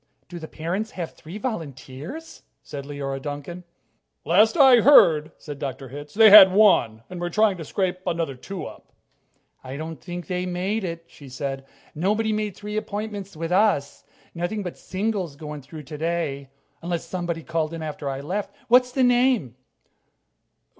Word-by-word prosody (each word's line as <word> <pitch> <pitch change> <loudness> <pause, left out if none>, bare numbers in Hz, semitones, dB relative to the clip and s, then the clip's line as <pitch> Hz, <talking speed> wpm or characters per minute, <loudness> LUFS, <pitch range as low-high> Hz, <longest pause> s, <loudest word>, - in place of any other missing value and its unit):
"Do 175 0 -8
the 160 - -8
parents 180 +9 -3
have 170 -3 -5
three 170 +6 -10
volunteers?" 165 - -7 0.2
said 140 -1 -7
Leora 140 -1 -5
Duncan. 145 +5 -6 0.6
"Last 220 +8 +4
I 265 -4 +8
heard," 165 - +6
said 145 -2 -9
Dr. 135 -2 -5
Hitz, 145 +2 -10
"they 220 -1 +8
had 195 -2 +11
one, 155 - +4
and 180 -1 -8
were 175 - -2
trying 210 +2 +3
to 165 - -6
scrape 185 +2 -2
another 165 -4 -1
two 180 +8 -7
up." - - -12 0.7
"I 130 +2 -7
don't 160 -3 -7
think 175 0 -7
they 180 0 -3
made 190 +4 -2
it," 170 -2 -5
she 140 -4 -14
said. 135 +1 -5 0.3
"Nobody 210 +7 0
made 210 -2 -2
three 210 +1 -6
appointments 205 -3 -5
with 165 +1 -4
us. 185 -7 +1 0.3
Nothing 175 +5 -3
but 180 - -6
singles 190 -5 -3
going 150 -1 -8
through 150 +3 -10
today, 150 -2 -3 0.3
unless 170 -1 -3
somebody 170 -1 -4
called 165 -1 -2
in 165 -1 -6
after 150 -2 -5
I 135 0 -4
left. 190 +8 -4
What's 250 +1 +5
the 260 +1 +1
name?" 245 - +2
170 Hz, 160 wpm, -24 LUFS, 145-205 Hz, 0.7 s, had